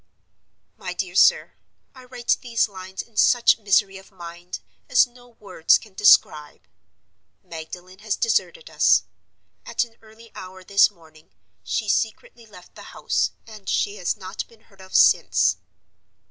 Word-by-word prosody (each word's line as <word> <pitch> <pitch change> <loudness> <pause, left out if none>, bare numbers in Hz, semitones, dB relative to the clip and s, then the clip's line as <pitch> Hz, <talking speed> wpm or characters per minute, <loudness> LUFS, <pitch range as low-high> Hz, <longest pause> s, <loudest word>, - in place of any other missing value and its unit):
"MY - - -6
DEAR - - -5
SIR,— - - +4 0.4
"I 255 -1 -15
write 245 -1 -1
these 235 -3 0
lines 190 -1 -8
in 225 -3 -24
such 240 -1 +4
misery 200 -2 +1
of 190 - -18
mind 175 -1 -9 0.3
as 255 - +5
no 245 0 -19
words 200 -8 +1
can 215 -4 -17
describe. 155 -7 +3 0.8
Magdalen 180 +3 -10
has 215 0 -2
deserted 470 - -1
us. - - +3 0.6
At - - -1
an 230 -1 -15
early 225 +1 -18
hour 185 0 -11
this 200 +2 +4
morning 160 -5 -21 0.3
she 220 - -3
secretly 225 +2 -3
left 180 -4 -17
the - - -13
house, - - 0 0.2
and 215 -3 -11
she 205 +1 -1
has 180 - -2
not 185 -2 -7
been 230 -2 -23
heard 195 -3 -21
of 190 0 -11
since. - - +4
205 Hz, 145 wpm, -22 LUFS, 185-230 Hz, 0.8 s, as